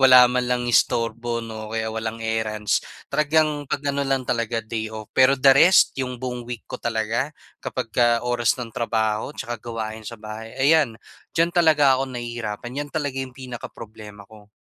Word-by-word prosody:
wala 130 Hz, -1 st, +9 dB
man 125 Hz, -1 st, 0 dB
lang 125 Hz, 0 st, 0 dB
istorbo 115 Hz, 0 st, +1 dB
'no, 110 Hz, -1 st, -7 dB
o 110 Hz, -, -4 dB
kaya 110 Hz, 0 st, -2 dB
walang 110 Hz, 0 st, -4 dB
errands. 110 Hz, -1 st, 0 dB, 0.3 s
Talagang 150 Hz, -1 st, +1 dB
pag-ano 140 Hz, 0 st, -1 dB
lang 135 Hz, -2 st, 0 dB
talaga, 115 Hz, -2 st, -1 dB
day-off. 110 Hz, -1 st, -5 dB
Pero 130 Hz, +1 st, +5 dB
the 135 Hz, +1 st, +6 dB
rest, 170 Hz, +7 st, +6 dB
'yong 125 Hz, -1 st, -3 dB
buong 125 Hz, -1 st, -5 dB
week 120 Hz, -2 st, -6 dB
ko -, -, -8 dB
talaga, 115 Hz, +4 st, -1 dB, 0.3 s
kapagka 120 Hz, +1 st, 0 dB
oras 120 Hz, -1 st, +1 dB
ng 120 Hz, -3 st, -6 dB
trabaho 110 Hz, -2 st, -1 dB
tsaka 120 Hz, -1 st, -5 dB
gawain 110 Hz, -2 st, -5 dB
sa 115 Hz, -, -8 dB
bahay, 110 Hz, +2 st, -9 dB
ayan, 140 Hz, -3 st, +3 dB, 0.4 s
diyan 170 Hz, +1 st, +3 dB
talaga 150 Hz, -6 st, +4 dB
ako 135 Hz, -, -2 dB
nahihirapan. 120 Hz, +2 st, -5 dB
'Yan 145 Hz, -, -5 dB
talaga 145 Hz, -3 st, -3 dB
yung 130 Hz, -1 st, -7 dB
pinakaproblema 110 Hz, -5 st, -9 dB
ko. 105 Hz, 0 st, -17 dB
120 Hz, 165 wpm, -23 LUFS, 110-135 Hz, 0.4 s, wala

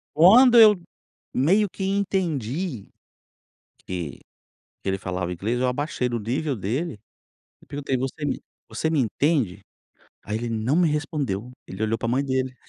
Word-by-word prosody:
Quando 235 Hz, +9 st, +7 dB
eu 215 Hz, -2 st, +9 dB, 0.6 s
meio 190 Hz, +10 st, +3 dB
que 190 Hz, -, -6 dB
entendi, 175 Hz, -, -1 dB, 1.0 s
que 85 Hz, -7 st, -5 dB, 0.6 s
que -, -, -1 dB
ele 95 Hz, -, 0 dB
falava 90 Hz, -2 st, -3 dB
inglês, 110 Hz, +8 st, -2 dB
eu 130 Hz, -, +2 dB
abaixei 125 Hz, 0 st, -1 dB
do 120 Hz, -1 st, -2 dB
nível 135 Hz, +6 st, -2 dB
dele, 115 Hz, -, -3 dB, 0.6 s
eu -, -, -20 dB
perguntei: 140 Hz, -1 st, -2 dB
"Você 135 Hz, +4 st, -3 dB
me 140 Hz, -, -1 dB, 0.3 s
você 160 Hz, -, -1 dB
me 160 Hz, -2 st, +1 dB
entende"? 130 Hz, -, 0 dB, 0.6 s
Aí 105 Hz, -, -3 dB
ele 120 Hz, +1 st, -3 dB
não 115 Hz, +5 st, 0 dB
me 175 Hz, -1 st, +4 dB
respondeu, 145 Hz, -, -2 dB, 0.2 s
ele 95 Hz, +3 st, -6 dB
olhou 110 Hz, +1 st, 0 dB
para 115 Hz, -, -2 dB
mãe 130 Hz, +4 st, +1 dB
dele. 130 Hz, -1 st, -1 dB
130 Hz, 150 wpm, -24 LUFS, 110-160 Hz, 1.0 s, eu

